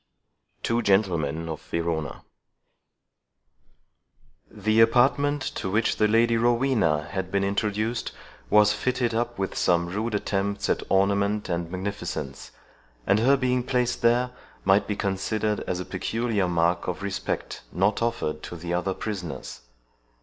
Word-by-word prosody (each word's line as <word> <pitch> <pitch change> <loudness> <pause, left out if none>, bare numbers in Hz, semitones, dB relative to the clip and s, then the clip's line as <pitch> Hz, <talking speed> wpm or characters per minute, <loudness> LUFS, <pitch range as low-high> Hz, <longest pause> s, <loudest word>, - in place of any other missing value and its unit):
TWO 115 +1 +1
GENTLEMEN 85 -7 +1
OF 80 -2 -5
VERONA 80 -3 -3 2.3
The 110 +2 +1
apartment 135 +5 +3
to 95 - -3
which 110 +4 +1
the 105 - +4
Lady 115 +2 +3
Rowena 115 - +2
had 95 -2 -3
been 100 0 +1
introduced 105 +3 -1 0.4
was 105 0 +5
fitted 120 +2 0
up 120 +1 -1
with 95 -1 -2
some 85 -1 +2
rude 105 +5 -2
attempts 100 0 -1
at - - +1
ornament 100 +2 +2
and 85 -1 -2
magnificence, 95 +3 -5 0.6
and 100 - +3
her 135 +5 +4
being 125 -1 +1
placed 125 -1 0
there 120 +2 +3 0.3
might 95 +2 +4
be 105 - -1
considered 105 +2 -1
as 90 - -1
a 90 - -4
peculiar 110 0 -1
mark 85 0 +1
of 90 +2 -3
respect 100 -1 -3
not 100 +4 +1
offered 115 -10 -1
to - - -7
the 85 +1 -4
other 90 +2 -1
prisoners. 85 - -5
100 Hz, 135 wpm, -26 LUFS, 90-115 Hz, 2.3 s, was